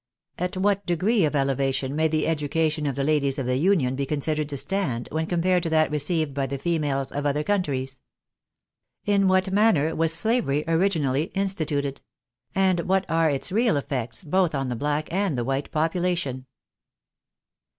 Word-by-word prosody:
" 160 - -50
At 180 - -5
what 200 +1 +1
degree 185 +3 +2
of 150 - -1
elevation 135 0 0
may 160 +1 +2
the 155 0 0
education 155 0 0
of 140 - -2
the 140 - -1
ladies 140 -2 +1
of 135 - -2
the 125 +1 0
Union 150 -6 +2
be 140 0 -2
considered 150 +1 -1
to 140 - -4
stand, 135 -9 -1
when 160 +1 -1
compared 180 +1 +1
to 165 - -2
that 155 -1 +2
received 150 0 0
by 135 -1 -1
the 140 - -4
females 145 -4 -1
of 145 +1 -2
other 145 +1 0
countries? 135 -9 -1 0.6
" - - -56
In 195 -1 +3
what 185 0 +2
manner 195 -7 +3
was 165 0 +2
slavery 165 - +1
originally 160 -5 +1
instituted? 155 -8 -1 0.3
" 120 -1 -42
And 185 -2 +2
what 190 0 +2
are 165 -1 +3
its 140 +2 -2
real 220 -3 +2
effects 130 - -4
both 175 0 +1
on 135 -2 -2
the 125 - -2
black 150 +5 -1
and 190 -7 0
the 120 - 0
white 135 +3 -2
population 160 -5 -1
155 Hz, 180 wpm, -25 LUFS, 140-180 Hz, 0.6 s, In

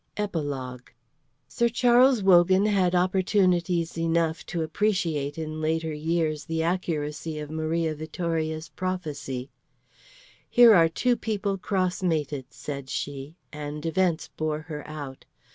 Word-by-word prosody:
EPILOGUE 140 -11 -4 0.5
Sir 235 0 +1
Charles 245 0 +4
Wogan 185 +1 +5
had 190 -4 +2
opportunities 180 -2 +1
enough 165 -1 0
to 170 -2 -2
appreciate 160 -5 -1
in 155 -1 -4
later 160 0 -1
years 155 0 -1
the 160 0 -1
accuracy 160 -3 -2
of 150 0 -6
Maria 160 +1 -1
Vittoria's 160 0 -3
prophecy. 145 -8 -4 1.0
"Here 240 -2 +8
are 165 -4 +6
two 245 +9 +1
people 205 -4 -2
cross 185 -2 -1
mated," 150 -6 -1
said 140 -2 -7
she, 140 +3 -5 0.2
and 150 +1 -6
events 165 0 0
bore 155 -1 -2
her 155 -2 -7
out. 145 -3 -8
165 Hz, 120 wpm, -26 LUFS, 150-185 Hz, 1.0 s, Here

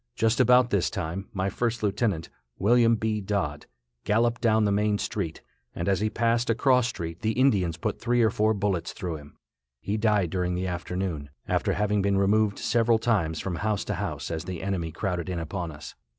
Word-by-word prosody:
Just 115 +1 +1
about 125 0 +5
this 100 -5 +2
time, 85 +5 -4
my 95 -1 -1
first 115 +2 -2
lieutenant, 100 -4 0 0.3
William 115 +3 +4
B. 110 -1 -1
Dodd, 95 -8 -2 0.4
galloped 115 +2 +1
down 110 -2 +3
the 100 - +2
main 105 +1 +2
street, 100 -7 -4 0.3
and 85 - -3
as 95 -2 +2
he 110 +1 +1
passed 115 +2 +1
a 115 - +3
cross 125 -1 +3
street 85 -7 -5
the 110 0 0
Indians 100 - +2
put - - -3
three 120 0 +2
or 110 - +3
four 110 +1 +2
bullets 100 -4 -1
through 85 -3 -4
him. 75 -1 -15 0.4
He 100 - -2
died 105 -6 +2
during 90 -1 -1
the 90 +1 -2
afternoon, 90 -4 -3 0.2
after - - +1
having 105 0 +1
been 100 0 +1
removed 100 +1 +2
several 115 -1 +2
times 100 -9 0
from 90 -3 -3
house 105 0 -1
to - - -2
house - - -4
as 80 -2 -3
the 90 -1 -5
enemy 90 -4 -2
crowded 90 +1 -3
in 90 - -2
upon 85 +1 -4
us. 75 0 -10
100 Hz, 195 wpm, -26 LUFS, 90-110 Hz, 0.4 s, about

